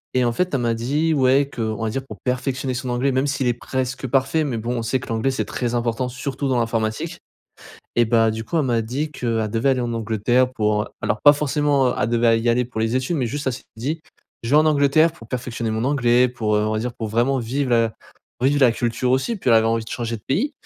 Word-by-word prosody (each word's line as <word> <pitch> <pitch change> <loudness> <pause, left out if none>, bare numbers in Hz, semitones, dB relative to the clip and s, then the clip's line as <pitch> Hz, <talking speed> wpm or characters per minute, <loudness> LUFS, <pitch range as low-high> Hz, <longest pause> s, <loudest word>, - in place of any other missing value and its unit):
Et 125 -1 +3
en 120 - +2
fait, 180 +4 -1
elle 130 - 0
m'a 115 -1 +1
dit: 145 +8 0
«Ouais» 135 0 +3
qu'on 110 -1 -2
va 110 - 0
dire, 135 - -2
pour - - -10
perfectionner 130 +1 -1
son 125 0 -4
anglais, 125 +3 +1
même 130 +2 +1
s'il 140 -2 -1
est 120 - +3
presque 130 +1 -3
parfait 135 +5 +1
mais 135 -6 -2
bon, 120 +2 -3
on - - -2
sait 125 +3 0
que - - -10
l'anglais 115 +3 0
c'est 110 -5 -2
très 120 +3 -3
important, 120 +1 -1
surtout 135 +2 -4
dans 130 -2 +1
l'informatique. 115 -1 -2 0.8
Et 120 - +5
bah, 115 0 +3
du 110 +1 -4
coup, 165 - -2
elle 155 - +2
m'a 120 -3 +1
dit 135 +7 -3
qu'elle 115 -5 -1
devait 115 +5 +1
aller 130 - +2
en 120 -1 -2
Angleterre 115 +3 +1
pour, 105 -3 +1
heu - - -9
alors 105 - -1
pas 145 - +10
forcément, 145 -2 +1
heu - - -1
elle 110 - +1
devait 115 -1 +3
y 120 - +1
aller 125 +1 +2
pour 110 -2 -4
les 115 +3 0
études 130 +7 -2
mais 130 - 0
juste 145 +3 -4
elle 130 - 0
s'est 125 - -9
dit: 155 +7 -3 0.4
«Je 115 - -4
vais 150 - +6
en 155 - +5
Angleterre 155 +2 +4
pour 115 -8 -14
perfectionner 120 -2 -3
mon 110 +3 -1
anglais 125 -3 +3
pour, 110 -3 -1
heu 105 - +1
on - - -1
va 110 - 0
dire 120 +2 -3
pour 115 -2 -5
vraiment 120 +5 +1
vivre 125 +3 -2
la 115 -2 +2 0.5
vivre 140 +2 +3
la 125 -4 +5
culture 120 +1 -1
aussi». 135 - 0
Puis 135 - -1
elle 115 - +6
avait 110 - +4
envie 115 0 0
de - - -10
changer 115 -1 -3
de 105 - -20
pays. 240 - 0
125 Hz, 260 wpm, -22 LUFS, 115-135 Hz, 0.8 s, pas